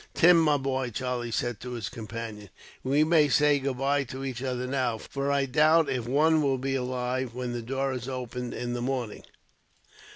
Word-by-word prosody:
"Tim, 175 0 +7
my 150 -3 +3
boy," 130 -2 -2
Charlie 125 0 -3
said 120 -1 -2
to 125 0 -7
his 115 -4 -4
companion, 110 -3 -7 0.3
"we 140 +3 +3
may 155 -2 +4
say 150 -1 +4
goodbye 135 +1 0
to 130 +2 -6
each 130 -2 -4
other 125 -1 -2
now, 125 -3 0
for 140 +5 -3
I 140 -1 +2
doubt 155 +4 +4
if 125 -3 -2
one 155 +4 +3
will 135 -2 +1
be 135 +1 -2
alive, 125 -1 -2
when 125 -1 -3
the 120 - -3
door 135 +3 -2
is 125 0 -5
opened 125 -1 -5
in 120 0 -3
the 120 - -3
morning." 125 -4 -3
130 Hz, 190 wpm, -27 LUFS, 120-140 Hz, 0.3 s, Tim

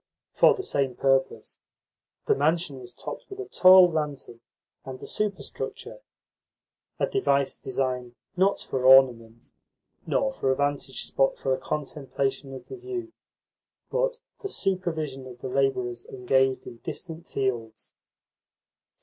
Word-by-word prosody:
For - - +5
the 385 - -5
same 135 - -1
purpose, 135 -4 0 0.7
the - - +4
mansion 150 -1 0
was 120 -1 -10
topped - - -8
with 390 -1 -9
a 395 - -4
tall 185 - +8
lantern 150 -7 -4 0.4
and 130 -1 -8
a - - -8
superstructure 210 - -4 1.0
a - - +2
device 140 - +1
designed, 125 -2 -2 0.2
not 190 +2 +2
for 130 - -3
ornament, 120 -3 +5 0.6
nor 270 -1 +1
for 135 - -1
a 130 - +3
vantage 145 -1 -1
spot 135 0 +1
for - - -4
the 130 - 0
contemplation 140 -2 -3
of 130 - -9
the 395 - -8
view, 365 -2 -6 0.8
but - - 0 0.2
for 400 - -4
supervision 160 - -2
of 125 -1 -10
the 130 - -4
labourers 125 -3 0
engaged 130 +1 +1
in 120 - -9
distant 165 +6 -7
fields. 120 -5 -3
135 Hz, 130 wpm, -26 LUFS, 130-180 Hz, 1.0 s, tall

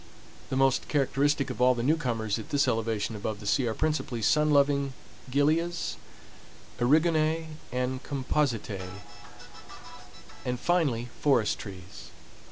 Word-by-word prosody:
The - - -2
most 135 -1 +2
characteristic 140 0 +1
of - - -8 0.2
the 115 - -1
newcomers 120 -7 0
at 110 - -9
this 145 +1 +2
elevation 110 -1 -1
above 105 0 -4
the 105 - -10
sea 125 +4 +2
are 110 - -2
principally 150 -7 -1
sun 150 +7 +3
loving 140 -1 +3 0.4
gilias, 160 +6 +1 0.8
eriogonae, 155 +4 +2 0.2
and 125 +1 -2
compositae, 130 -7 -1 1.6
and 125 -1 -2
finally 135 -8 +1
forest 130 -7 +2
trees. 95 -3 -10
135 Hz, 115 wpm, -28 LUFS, 115-150 Hz, 1.6 s, sun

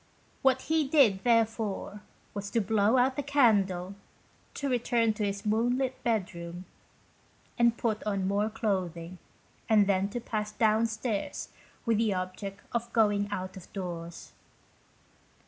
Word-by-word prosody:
What 260 -1 +3
he 315 -2 +1
did, 250 -10 +4
therefore, 225 -3 0 0.3
was 200 -1 -5
to 230 - +1
blow 215 +3 +2
out 260 +2 +2
the - - +1
candle, 205 -10 +2 0.6
to 280 - -2
return 235 -3 +2
to 215 - -3
his 200 0 -2
moonlit 245 +5 0
bedroom, 180 -6 -2 0.9
and 235 -1 +3
put 220 -2 -1
on 200 -3 -1
more 205 +2 +1
clothing, 185 -5 -3 0.5
and 215 -2 +6
then 195 0 +1
to 240 - -4
pass 215 -3 -3
downstairs 220 0 0 0.4
with 225 -3 +2
the 220 -4 +2
object 190 +2 -5
of 235 0 -2
going 205 -2 +3
out 185 -2 -4
of 190 - -12
doors. 170 -3 -6
215 Hz, 130 wpm, -29 LUFS, 195-235 Hz, 0.9 s, and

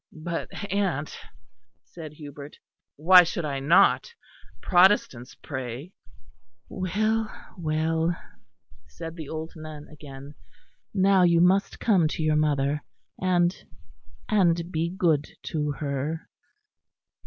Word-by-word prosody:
"But, 165 +2 -5 0.2
aunt," 175 -8 -1 0.7
said 155 -3 -10
Hubert, 145 -1 -10 0.4
"why 180 +5 +8
should 170 -1 -2
I 140 -2 -2
not? 170 - +3 0.4
Protestants 175 - +3
pray." 130 +5 -7 0.8
"Well, 215 +4 -1 0.2
well," 160 0 0 0.7
said 165 -1 -8
the 160 -4 -8
old 160 +1 -6
nun 155 -2 -9
again. 140 -1 -11 0.6
"Now 195 -1 +4
you 170 -1 +4
must 190 +3 +2
come 190 -8 +3
to 160 - -3
your 155 -1 +2
mother; 145 -1 +1 0.4
and 180 -1 +2 0.7
and 175 -5 +2
be 165 0 -1
good 165 -5 +1 0.2
to 150 -2 -2
her." 145 +3 -4
160 Hz, 105 wpm, -26 LUFS, 150-180 Hz, 0.8 s, why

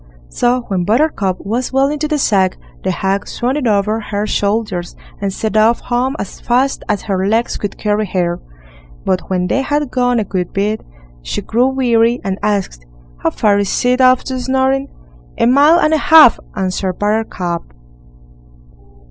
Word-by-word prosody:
So 245 +1 +1
when 190 -6 -2
Buttercup 215 - 0
was 235 +5 -2
well 270 +1 +3
into 300 +1 -2
the 305 0 0
sack, 195 -8 +1 0.3
the 190 - -1
hag 195 +2 -1
swung 250 +2 -2
it 290 -5 -1
over 210 +1 +1
her 210 -1 -3
shoulders 200 -4 -2 0.3
and 200 -1 -1
set 215 +3 -3
off 220 +2 +4
home 255 +3 -1
as 200 - -7
fast 255 +3 0
as 210 -1 -1
her 195 -2 -1
legs 225 +3 0
could 205 - -5
carry 210 0 -1
her. 175 -2 -1 0.7
But 185 -1 -1
when 180 -1 0
they 270 +9 0
had 290 0 -1
gone 245 -1 +1
a - - 0
good 185 -3 -4
bit, 210 +2 -1 0.4
she - - -4
grew 245 +3 +1
weary, 240 -2 +2
and 195 0 -3
asked: 200 - -2 0.3
"How - - 0
far 205 -2 +1
is 200 +4 -1
it 250 +1 +3
off 255 0 +5
to 260 -1 -4
Snoring?" 265 +2 0 0.5
"A - - +2
mile 285 +7 +5
and 310 -2 +2
a - - +4
half", 310 -4 +7 0.2
answered 185 0 -2
Buttercup. 205 -5 -2
220 Hz, 170 wpm, -16 LUFS, 195-255 Hz, 0.7 s, half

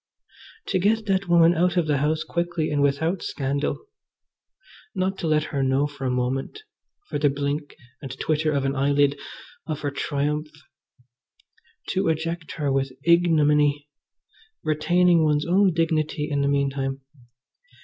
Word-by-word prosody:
To 185 - +1
get 215 +4 +1
that 195 -1 0
woman 170 0 +6
out 175 +1 +1
of 175 - +3
the 145 -2 +1
house 155 +2 0
quickly 170 -2 -2
and 145 -1 +1
without 160 +6 +1
scandal. 140 - -3 1.1
Not 190 +1 0
to 170 - -2
let 155 -1 +2
her 140 - 0
know 135 +2 +2
for 140 -2 -6
a - - +1
moment, 130 - -2 0.4
for - - -3
the 145 0 +3
blink 145 +1 -3 0.3
and 135 - -7
twitter 155 0 0
of 140 -2 0
an 135 +1 -1
eyelid, 140 +1 +2 0.5
of 155 -2 -4
her 145 - -2
triumph. 145 +2 -2 1.4
To 190 - 0
eject 165 +1 -2
her 145 -3 -1
with 135 0 0
ignominy, 150 -4 +3 0.7
retaining 170 +2 +3
one's 150 -1 +1
own 190 +2 +3
dignity 155 -2 0
in 140 -1 0
the 140 - +1
meantime. 135 -1 -1
150 Hz, 145 wpm, -24 LUFS, 140-170 Hz, 1.4 s, woman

